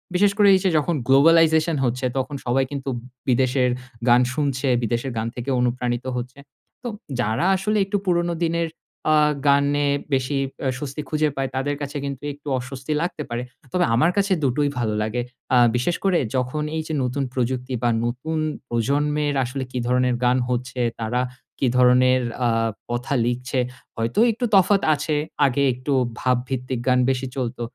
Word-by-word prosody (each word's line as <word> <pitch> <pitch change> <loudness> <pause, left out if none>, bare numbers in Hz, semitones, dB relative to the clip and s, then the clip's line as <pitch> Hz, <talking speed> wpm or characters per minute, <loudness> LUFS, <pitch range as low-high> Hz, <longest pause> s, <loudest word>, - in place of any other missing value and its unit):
বিশেষ 200 +2 +4
করে 205 -1 +5
এই 190 - +3
যে 190 - +3
যখন 155 +2 +1
গ্লোবালাইজেশন 160 +3 +5
হচ্ছে 125 +2 -1
তখন 135 +2 -2
সবাই 130 +2 +2
কিন্তু 140 -1 -4 0.4
বিদেশের 125 0 +2 0.4
গান 120 +1 +6
শুনছে, 140 -2 -1 0.2
বিদেশের 120 +4 -1
গান 110 +1 -1
থেকে 120 +2 -5
অনুপ্রাণিত 125 0 -1
হচ্ছে। 125 +3 -6 0.4
তো - - -4 0.3
যারা 115 +6 0
আসলে 210 +3 0
একটু 205 +1 -1
পুরোনো 175 -1 +1
দিনের 170 0 0 0.5
আ - - +5 0.3
গানে 140 +1 +3 0.3
বেশি 135 +1 0 0.3
এ 130 - +2
স্বস্তি 145 +1 -5
খুঁজে 155 0 +1
পায় 135 -1 -2
তাদের 140 +2 -1
কাছে 145 +1 -4
কিন্তু 140 0 -5
একটু 145 +1 -16
অস্বস্তি 130 +3 -6
লাগতে 170 -3 -3
পারে। 120 +1 -3 0.3
তবে 180 -1 +3
আমার 160 +8 +4
কাছে 200 -1 +3
দুটোই 140 +2 +1
ভালো 110 -3 0
লাগে, 110 +3 -1 0.3
আ - - +6 0.2
বিশেষ 125 +8 +1
করে 190 -3 +3 0.2
যখন 130 +4 -1
এই - - 0
যে 160 - -3
নতুন 130 +3 -1
প্রযুক্তি 125 +1 -2
বা 120 - +3 0.2
নতুন 130 +7 -3 0.3
প্রজন্মের 145 +5 0
আসলে 130 +2 -4
কি - - -4
ধরনের 125 0 +2
গান 125 +1 +4
হচ্ছে 125 +1 -2 0.2
তারা 120 +3 0 0.4
কি 135 - +2
ধরনের 125 0 +5 0.3
আ - - +3 0.4
কথা 120 +3 -2
লিখছে। 125 +2 -1 0.4
হয়তো 115 - -1
একটু 240 +3 -2
তফাৎ 195 +1 +5
আছে, 150 +1 -1 0.3
আগে 140 +1 +1
একটু 130 +3 -3 0.3
ভাবভিত্তিক 130 0 -1
গান 125 0 +4
বেশি 130 0 -1
চলতো 120 -2 -3
135 Hz, 165 wpm, -23 LUFS, 125-150 Hz, 0.5 s, গান